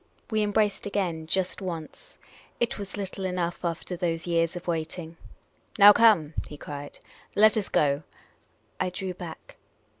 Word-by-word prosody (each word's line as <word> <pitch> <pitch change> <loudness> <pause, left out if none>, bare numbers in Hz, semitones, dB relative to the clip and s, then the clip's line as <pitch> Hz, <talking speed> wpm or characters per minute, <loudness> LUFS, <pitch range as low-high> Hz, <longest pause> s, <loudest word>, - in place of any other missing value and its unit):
We 215 -1 +2
embraced 210 -1 +1
again, 175 -6 -2
just 185 +3 -1
once. 165 -5 -7 0.4
It 235 -2 0
was 200 0 -6
little 195 -1 -4
enough 180 -2 -2
after 170 +1 -3
those 165 -2 -2
years 165 0 +1
of 175 - -7
waiting. 165 0 -3 0.3
" - - -21
Now 205 0 +10
come! 205 -10 +5
" - - -8
he 150 - -9
cried. 145 0 -8 0.2
" - - -20
L,et 215 +1 +7
us 210 -3 0
go." 140 -1 +2 0.8
I - - +1
drew 185 0 -4
back. 175 -3 -10
180 Hz, 160 wpm, -27 LUFS, 165-200 Hz, 0.8 s, Now